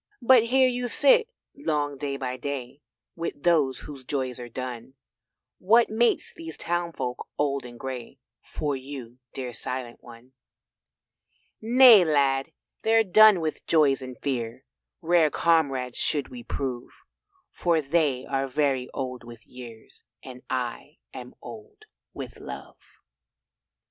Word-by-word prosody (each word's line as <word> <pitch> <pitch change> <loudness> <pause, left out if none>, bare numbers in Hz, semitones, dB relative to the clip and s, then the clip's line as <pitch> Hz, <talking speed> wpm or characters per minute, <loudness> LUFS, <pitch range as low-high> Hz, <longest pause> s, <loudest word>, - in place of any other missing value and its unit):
But 240 -2 +6
here 260 +2 +4
you 245 0 -2
sit 480 - +4 0.3
long 150 - -2
day 140 0 -4
by 130 -2 -4
day 140 0 -6 0.3
With 165 -4 -5
those 150 -7 +2
whose 140 -3 -10
joys 130 -2 -3
are 120 0 -8
done; 125 +1 -7 0.6
What 225 +4 +4
mates 235 +2 +1
these 165 -1 -9
townfolk 170 -7 -3
old 140 -2 -1
and 120 -1 -11
grey 130 0 -7 0.2
For 145 -2 -3
you 130 -2 -9 0.2
dear 125 -2 -5
Silent 120 +2 -6
one. 120 +1 -14 1.3
"Nay, 235 -2 +8
Lad, 140 -2 +1 0.3
they're 225 0 +4
done 215 -1 +6
with 155 -1 -4
joys 145 -4 +3
and 130 -2 -8
fears. 125 -2 -4 0.4
Rare 165 -2 +4
comrades 140 -7 +1
should 145 -2 0
we 125 -1 -9
prove, 125 0 -4 0.6
For 170 -2 +1
they 145 -3 0
are 135 0 -1
very 135 -2 0
old 130 -3 -4
with 115 -1 -13
years 120 -3 -12 0.2
And 125 -1 -10
I 130 +3 -4 0.2
am 125 -1 -9
old 415 - -12 0.3
with - - -9
love." - - -9
140 Hz, 130 wpm, -26 LUFS, 125-170 Hz, 1.3 s, Nay